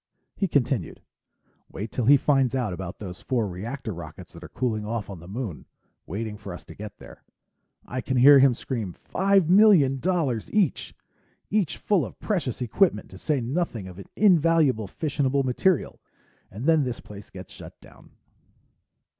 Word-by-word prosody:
He 195 - 0
continued, 135 -5 -1 0.7
"Wait 105 +4 -6
till 125 - -2
he 140 +4 +7
finds 135 -2 +2
out 120 -7 -1
about 90 0 -6
those 90 -4 -8
four 120 -5 -1
reactor 110 +6 -5
rockets 85 +1 -10
that 85 0 -12
are - - -10
cooling 110 -4 -2
off 105 -1 -4
on 95 - -8
the 85 - -13
Moon, 105 - -6 0.4
waiting 105 +4 -4
for 100 -3 -8
us - - -13
to - - -11
get 105 0 -9
there. - - -14 0.6
I 130 +1 -4
can 130 0 -2
hear 140 +3 +8
him 135 -2 +5
scream, 110 -8 -4
'Five 195 - +1
million 180 -9 +5
dollars 155 - -1
each! 205 -9 0 0.6
Each 200 -6 0
full 200 -5 +1
of - - -8
precious 140 - -2
equipment, 175 - +1
to - - -11
say 150 -4 0
nothing 120 - -2
of 90 +1 -10
invaluable 165 - +3
fissionable 140 - -1
material!' 135 +6 0 0.5
And 110 +7 -7
then 160 -2 +4
this 125 -2 -4
place 105 -1 -12
gets 95 -1 -11
shut - - -12
down." - - -18
125 Hz, 165 wpm, -25 LUFS, 105-155 Hz, 0.7 s, hear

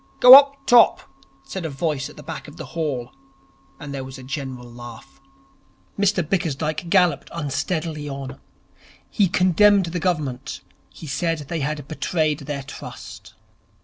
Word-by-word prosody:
'Gow 250 +1 +10
up 280 0 +7
top!' 240 -2 +6 0.4
said 135 +7 -6
a 160 - -3
voice 140 -1 -2
at - - -16
the - - -11
back - - -7
of - - -13
the - - -7
hall, 145 -7 -3 0.7
and 145 -1 -8
there 135 -1 -4
was 130 0 -9
a 130 - -11
general 130 -2 -6
laugh. 120 +1 -12 0.7
Mr 195 -5 +1
Bickersdyke 160 -1 -2
galloped 180 -1 +2
unsteadily 155 0 -3
on. 135 -1 -7 0.7
He 205 -3 +3
condemned 185 +3 +4
the 170 +1 -4
Government. 150 -8 -3 0.3
He - - -12
said 165 +3 -1
they 155 +3 -5
had 145 -1 -3
betrayed 155 -1 -1
their 140 -1 -5
trust. - - -11
155 Hz, 145 wpm, -22 LUFS, 135-175 Hz, 0.7 s, Gow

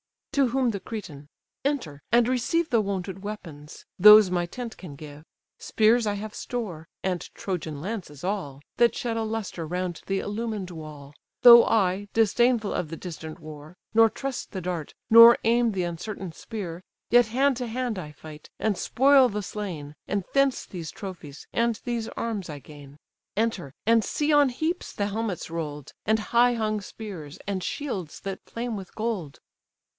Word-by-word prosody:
To 275 -2 +3
whom 255 0 +1
the 200 - -4
Cretan: 175 -9 -8 0.4
"Enter, 245 - -2
and 235 0 +5
receive 260 +7 +1
The 230 -2 +3
wonted 195 -2 -4
weapons; 165 -8 -8
those 210 0 +9
my 175 -1 +1
tent 235 +4 -7
can 165 -7 -9
give; 150 +1 -11 0.3
Spears 225 +1 +3
I 205 - +1
have 210 +1 -6
store, 185 -10 -5 0.2
(and 185 -2 0 0.2
Trojan 160 -6 -4
lances 175 -7 -6
all,) 180 -8 -3 0.2
That 235 -1 +4
shed 235 -2 -2
a 225 - 0
lustre 215 -7 -4
round 180 0 -3
the 195 0 0
illumined 210 -3 -4
wall, 150 -3 -10 0.3
Though 235 -1 +10
I, 200 -2 +1
disdainful 225 0 +3
of 165 - -2
the 165 - -5
distant 160 -3 -8
war, 155 +2 -11 0.2
Nor 225 0 +6
trust 270 +1 -5
the 190 - -3
dart, 175 -4 -4
nor 230 +1 +10
aim 235 0 +3
the 185 -2 -1
uncertain 175 +2 -5
spear, 180 -2 -7 0.3
Yet 240 -1 +6
hand 265 +3 +2
to 250 -1 -3
hand 235 -3 -2
I 150 -4 -8
fight, 150 +1 -12
and 215 -4 0
spoil 270 0 +5
the 210 -1 -3
slain; 170 -8 -6
And 200 -1 -1
thence 275 -1 +2
these 170 -4 -7
trophies, 175 -8 -9
and 235 -1 +1
these 235 -2 -2
arms 210 -6 -3
I 150 - -6
gain. 145 0 -13 0.4
Enter, 205 - -1
and 230 0 +4
see 295 +7 0
on 290 -2 +5
heaps 315 +8 -3
the 200 - -1
helmets 205 -5 -3
roll'd, 150 -4 -5
And 220 +1 +3
high 245 +1 +5
hung 215 -2 -1
spears, 185 -8 -8
and 195 -2 -2
shields 190 - -4
that 195 -1 -6
flame 235 0 -3
with 195 -3 -9
gold." 215 -10 -3
205 Hz, 170 wpm, -26 LUFS, 165-230 Hz, 0.4 s, Though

